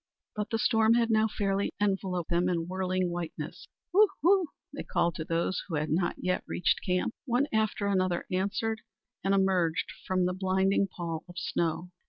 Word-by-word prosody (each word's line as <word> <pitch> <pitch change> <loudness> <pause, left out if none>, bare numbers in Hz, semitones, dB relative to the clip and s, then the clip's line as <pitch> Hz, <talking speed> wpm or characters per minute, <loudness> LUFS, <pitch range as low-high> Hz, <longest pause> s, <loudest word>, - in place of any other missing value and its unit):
But 210 0 -3
the 225 - 0
storm 225 -1 +4
had 235 -1 +2
now 220 0 +4
fairly 200 -2 -1
enveloped 190 -4 -1
them 175 +1 +2
in 170 -2 -1
whirling 185 -1 -1
whiteness. 175 -2 -5 0.3
"Woo, 420 +3 +7 0.2
woo!" 370 0 +5 0.3
they 285 - -5
called 170 - 0
to 160 - -4
those 170 +3 -1
who 170 - -3
had 150 +1 -1
not 175 +2 +1
yet 180 0 -1
reached - - +1
camp. 180 +4 0
One 250 +1 +2
after 215 -1 +1
another 185 -3 +1
answered 200 +4 -1 0.4
and 195 - +1
emerged 185 -4 +1 0.2
from 185 -1 +2
the 180 - 0
blinding 190 +1 +2
pall 170 -4 -5
of 175 - -12
snow. 175 0 -1
185 Hz, 175 wpm, -29 LUFS, 175-210 Hz, 0.4 s, Woo